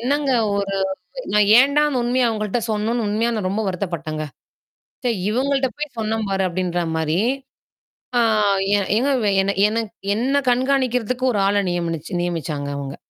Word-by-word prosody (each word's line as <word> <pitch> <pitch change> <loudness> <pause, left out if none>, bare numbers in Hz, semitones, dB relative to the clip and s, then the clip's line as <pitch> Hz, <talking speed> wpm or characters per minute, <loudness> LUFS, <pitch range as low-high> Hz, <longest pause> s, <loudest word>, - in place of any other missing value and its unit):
என்னங்க 280 +3 0 0.2
ஒரு 200 -1 -1 0.6
நான் 210 -1 +4
ஏன்டா 280 +4 +5
அந்த 265 -4 -1
உண்மைய 245 +1 +2
அவங்கள்ட்ட 215 0 -1
சொன்னோம்னு 220 +2 -1
உண்மையா 220 +3 +1
நான் 205 -4 -1
ரொம்ப 205 +3 -1
வருத்தப்பட்டேங்க. 170 -5 -3 0.8
சே, 245 - +2 0.2
இவங்கள்ட்ட 265 +3 +1
போய் 300 -3 -5
சொன்னேன் 220 0 -1
பாரு 195 0 0
அப்படின்ற 175 0 -1
மாரி. 160 +2 0 1.0
ஆ, - - +5 0.8
ஏங்க 255 +5 +1 0.6
என்ன 220 +2 -1 0.4
என்ன 260 +6 +1
கண்காணிக்கிறதுக்கு 255 -1 +1
ஒரு 205 - 0
ஆள 200 +1 +2
நியமினி 170 -2 -2 0.2
நியமிச்சாங்க 160 -5 -3
அவங்க. 140 -1 -5
215 Hz, 135 wpm, -21 LUFS, 180-250 Hz, 1.0 s, ஏன்டா